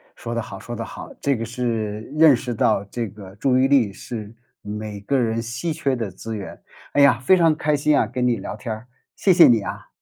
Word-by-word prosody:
说 115 0 -6
的 115 - 0
好 100 -3 -9
说 120 +2 -7
的 115 - -4
好。 - - -9
这 140 -1 +1
个 115 - -4
是 115 -3 -2 0.2
认 155 -4 +7
识 125 -1 -4
到 105 -2 +2
这 115 +3 -4
个 95 -1 -12
注 130 +4 +2
意 130 +1 +4
力 135 -7 +3
是 110 0 -7 0.3
每 105 0 -6
个 135 +7 0
人 115 -2 0
稀 120 +8 -3
缺 135 -3 0
的 115 -6 -4
资 110 +4 -7
源。 100 -2 -8 0.3
哎 145 - +4
呀， 140 -4 +6
非 185 +9 +4
常 165 -2 +4
开 150 0 +1
心 145 +1 +2
啊， - - +3
跟 125 0 -1
你 120 -2 +2
聊 105 - -6
天 110 +1 -5
儿， 110 +3 -10 0.3
谢 190 - +3
谢 170 -1 +8
你 115 -3 +4
啊。 - - -7
115 Hz, 250 characters per minute, -22 LUFS, 110-135 Hz, 0.3 s, 谢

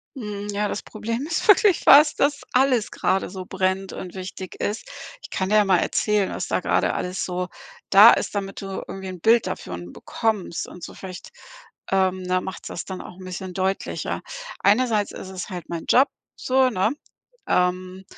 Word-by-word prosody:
Mhm. 210 -4 -6
Ja, 205 +1 0
das - - -4
Problem 230 +5 -4
ist 325 +6 -2
wirklich 415 -3 +6
das, 295 +2 +8
dass 285 0 +1
alles 255 -4 +2
gerade 190 - 0
so 185 -1 -7
brennt 190 0 -1
und 180 -2 -7
wichtig 185 0 -7
ist. 210 +2 -3 0.3
Ich - - -11
kann 190 0 -2
dir 215 - +3
ja 210 -1 +5
mal 185 -2 +4
erzählen, 210 +1 +1
was - - -4
da - - 0
gerade - - +1
alles 180 +1 -3
so 180 0 -3 0.4
da 205 +4 +10
ist, - - -1
damit 195 -1 -3
du 195 -1 -5
irgendwie 190 0 -7
'n 185 -2 -7
Bild 230 +1 +4
davon 90 0 -6
bekommst 215 -7 -2
und 180 - -12
so - - -7
vielleicht, 185 -2 -9 0.6
ähm, 185 -1 +1
da 185 0 +1
macht's 190 - -7
das - - -5
dann 190 -1 -6
auch - - -11
'n 190 - -11
bisschen 185 0 -6
deutlicher. 190 +1 -2 0.4
Einerseits 215 0 +2
ist 190 - -8
es 190 +1 -6
halt 180 -2 -7
mein 170 -1 -5
Job 265 +2 +5 0.3
so, 260 0 +2
ne, 215 -1 +1 0.6
ähm, 185 +1 0
195 Hz, 185 wpm, -23 LUFS, 185-220 Hz, 0.6 s, da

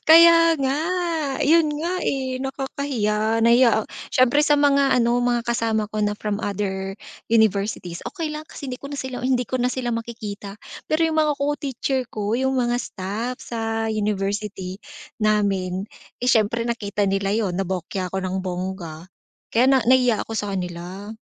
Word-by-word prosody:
Kaya 330 0 +8
nga. 270 0 +1 0.7
Yun 325 +3 +5
nga, 345 +2 -1
eh, 260 -2 -1
nakakahiya. 235 -6 -1
Nahiya 235 +1 +6
ak - - -11 0.3
syempre 255 +3 +4
sa 295 -1 +4
mga 280 -2 +4
ano, 240 0 +3
mga 240 -1 +1
kasama 225 -2 0
ko 215 - -4
na 205 0 +1
from 210 -1 -2
other 195 -1 -2 0.4
universities, 200 -5 +1
okey 330 -5 -4
lang 305 0 -5
kasi 285 - -9
hindi 250 -1 -5
ko 280 - -7
na 285 - -5
sila 260 -2 -5
hindi 250 -1 +1
ko 260 - -1
na 250 - +2
sila 245 -2 -2
makikita. 215 -3 -6 0.4
Pero 325 +1 +3
yung 315 -1 0
mga 305 -1 +3
co-teacher 280 -2 -1
ko, 210 +1 -2
yung 265 0 +1
mga 240 -1 +1
staff 225 +4 -4
sa 225 -1 -2
university 205 -2 -2 0.4
namin, 195 -3 +1 0.4
eh, - - 0
siyempre 225 +1 +2
nakita 205 -4 -1
nila 195 0 0
yun, 210 -5 0
nabokya 185 -1 -3
ako 190 - -2
ng 185 0 -2
bongga 180 -3 -5 0.5
kaya 245 +3 +4
na 265 -2 +4
nahiya 250 -2 +4
ako - - -8
sa 210 -2 -2
kanila. 180 +4 -6
225 Hz, 160 wpm, -23 LUFS, 200-260 Hz, 0.7 s, Kaya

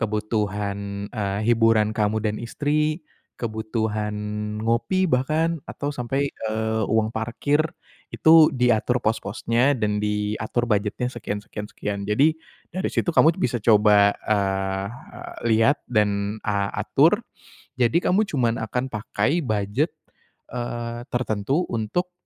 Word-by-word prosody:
kebutuhan, 105 -2 -2
eee, 100 -3 -2
hiburan 115 -2 +3
kamu 110 0 0
dan 105 0 0
istri, 150 +6 -1 0.3
kebutuhan 110 -2 -2 0.5
ngopi 120 +12 +1
bahkan, 155 +3 +1
atau, 145 +1 -4
sampai, 135 +2 -2
eee, 110 0 -2
uang 110 0 +1
parkir 120 +7 0 0.5
itu 160 -1 +6
diatur 125 -1 +1
pos-posnya, 115 +5 +1
dan 105 -2 0
diatur 105 +3 -1
budgetnya 110 +3 -1
sekian 105 -3 -5
sekian 105 0 -7
sekian. 100 -1 -4
Jadi, 140 +9 +4 0.4
dari 185 +2 -1
situ 175 - -1
kamu 160 +1 +5
bisa 120 -2 -1
coba, 105 -2 +5
eee 95 -2 0
eee, 125 +4 -10 0.2
lihat, 115 +6 +3
dan, 105 -2 0
a 100 -1 0
atur. - - +3 0.6
Jadi 140 +9 +3
kamu 205 +3 +2
cuman 120 -5 0
akan 125 +4 -3
pakai 110 +8 0
budget, 110 - -1 0.6
eee, 120 -1 -4
tertentu, 120 - 0
untuk, 120 - -2
110 Hz, 120 wpm, -24 LUFS, 105-130 Hz, 0.6 s, itu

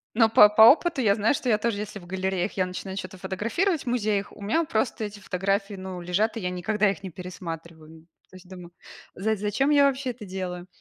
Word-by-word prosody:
Но 225 -1 +5
по 210 -1 +8
по 220 +1 +6
опыту 295 +3 +5
я 200 -3 +3
знаю, 220 +5 +2
что 260 - -4
я 215 -3 +4
тоже, 225 -2 -1
если 210 -1 -6
в 175 - -14
галереях 190 +1 -2
я 185 -1 0
начинаю 190 +1 -6
чё-то 185 0 -7
фотографировать, 230 - -1
в - - -20
музеях, 210 -4 -1
у - - -15
меня 230 +12 +1
просто 220 -3 -1
эти 205 0 -8
фотографии, 195 +2 -2
ну, 185 -1 -7
лежат, 200 +7 0
и - - -4
я 180 - -2
никогда 200 +3 0
их 195 - -8
не 190 - -5
пересматриваю. 165 -3 -9 0.2
То - - -17
есть 185 0 -15
думаю: 175 -2 -11 0.4
за 220 +4 0
зачем 210 +8 0
я 285 -1 +5
вообще 265 -1 -2
это 225 -3 -11
делаю? 180 -1 -6
200 Hz, 220 wpm, -25 LUFS, 185-220 Hz, 0.4 s, по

